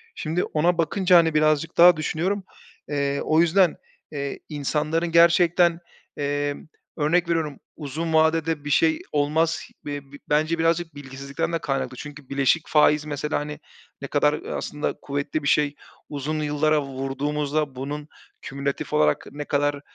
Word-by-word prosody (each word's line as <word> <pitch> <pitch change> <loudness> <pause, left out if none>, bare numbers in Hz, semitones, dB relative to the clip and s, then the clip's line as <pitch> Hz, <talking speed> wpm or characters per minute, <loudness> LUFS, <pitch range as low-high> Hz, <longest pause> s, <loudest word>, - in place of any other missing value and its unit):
Şimdi 165 +3 -1
ona 170 +3 +1
bakınca, 180 +2 +3
hani, 165 -2 +4
birazcık 155 +1 +1
daha 175 -1 +8
düşünüyorum. 175 +6 -1 0.5
Eee, 140 -1 -1
o 155 +1 +4
yüzden, 170 +1 +3 0.3
eee, 140 -2 -4
insanların 155 +3 -1
gerçekten, 170 0 +4 0.4
emm, 145 0 -2 0.3
örnek 170 +3 +1
veriyorum 160 -4 -1 0.2
uzun 160 +2 -4
vadede 160 -1 +2
bir 145 - -3
şey 315 - +3
olmaz. 150 +3 +1 0.2
Be 145 -1 -6
bi 140 - -10
bence 155 +3 +1
birazcık 165 -1 0
bilgisizlikten 140 +3 -5
de 165 - 0
kaynaklı. 135 -4 -3
Çünkü 145 -1 -10
"bileşik 140 +3 +1
faiz" 150 0 +4
mesela 150 0 -2
hani 150 0 -6 0.4
ne 140 - -5
kadar, 150 +1 +2
ııı, 150 - -5
aslında 150 0 -3
kuvvetli 145 +2 -3
bir - - -2
şey. 145 0 +2 0.3
Uzun 150 +2 -3
yıllara 150 0 +1
vurduğumuzda 140 +2 -2
bunun 145 +3 -5 0.3
kümülatif 140 0 -4
olarak 75 0 +2
ne 145 0 -6
kadar 145 0 0
150 Hz, 145 wpm, -24 LUFS, 145-165 Hz, 0.5 s, daha